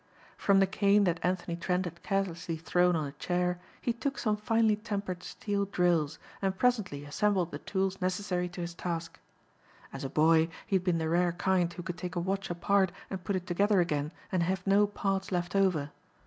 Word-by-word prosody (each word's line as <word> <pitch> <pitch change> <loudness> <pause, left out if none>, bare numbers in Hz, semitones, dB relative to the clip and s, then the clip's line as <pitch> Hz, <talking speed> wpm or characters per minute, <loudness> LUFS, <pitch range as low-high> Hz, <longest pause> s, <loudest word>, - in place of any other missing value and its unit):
From 200 -1 +3
the 195 - +6
cane 200 +2 +3
that 175 -2 +1
Anthony 180 -1 -1
Trent 180 +2 0
had 170 0 -7
carelessly 180 -4 -2
thrown 175 +2 +2
on 155 -2 0
a 140 - -5
chair, 180 +4 -1 0.2
he 240 - 0
took 275 +4 -3
some 215 -3 +1
finely 220 0 +2
tempered 200 -4 -4
steel 200 +1 -2
drills 175 -6 +1 0.2
and 190 -1 0
presently 205 - +1
assembled 180 +3 +1
the - - -5
tools 190 0 -2
necessary 180 -1 -1
to 180 0 -7
his 170 0 -4
task. 170 -1 -4 0.7
As 135 - -6
a 135 - -3
boy 160 +3 +4 0.2
he 195 - 0
had 180 - -4
been 180 -2 +2
the 160 -1 -1
rare 175 +1 +2
kind 175 0 +1
who 175 0 -7
could 175 -1 -5
take 180 0 -5
a - - +1
watch 190 +2 -2
apart 190 +2 +2 0.2
and 190 -2 -4
put 200 - -1
it 180 -1 -3
together 200 +3 +2
again 150 -3 0 0.2
and 185 - +1
have 185 +1 -1
no 205 +1 +5
parts 195 -1 -2
left 180 +1 -1
over. 180 -7 +2
180 Hz, 200 wpm, -30 LUFS, 170-195 Hz, 0.7 s, the